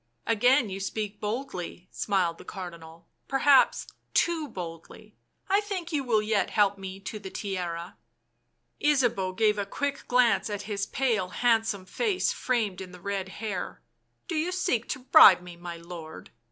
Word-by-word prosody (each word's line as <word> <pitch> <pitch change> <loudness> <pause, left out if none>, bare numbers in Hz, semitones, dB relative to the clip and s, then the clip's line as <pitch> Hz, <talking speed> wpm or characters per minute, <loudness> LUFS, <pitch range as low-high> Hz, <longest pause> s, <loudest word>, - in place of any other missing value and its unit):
" 120 0 -46
Again 245 0 +3
you 190 - -4
speak 205 +1 -4
boldly," 210 -6 -5
smiled 180 -4 0
the - - -10
Cardinal. 170 -3 -9 0.2
C£ - - -47
Perhaps 275 0 +4 0.3
too 330 -3 +2
boldly 180 - -9 0.2
— - - -48
I 395 +1 +3
think 380 -5 -5
you 285 -2 +1
will 220 -4 +2
yet 210 -1 +1
help 200 -2 +2
me 190 0 -7
to 215 +2 -6
the 195 -2 -8
Tiara." 180 -4 -4 0.9
Ysabeau 245 -11 +2
gave 210 -2 +3
a 200 - -1
quick 285 +6 -3
glance 240 -4 +3
at 205 -1 -4
his 200 -2 -3
pale, 225 -9 0
handsome 225 -2 +1
face 410 - 0
framed 220 -7 -1
in 185 -1 -9
the 180 - -11
red 195 0 -3
hair. 190 0 -5 0.2
" - - -47
Do 360 - -4
you 325 +3 0
seek 250 -10 0
to - - -1
bribe 230 - +8
me, 180 -1 -10
my 170 0 -7
lord?" 170 -1 -10
205 Hz, 170 wpm, -27 LUFS, 185-250 Hz, 0.9 s, bribe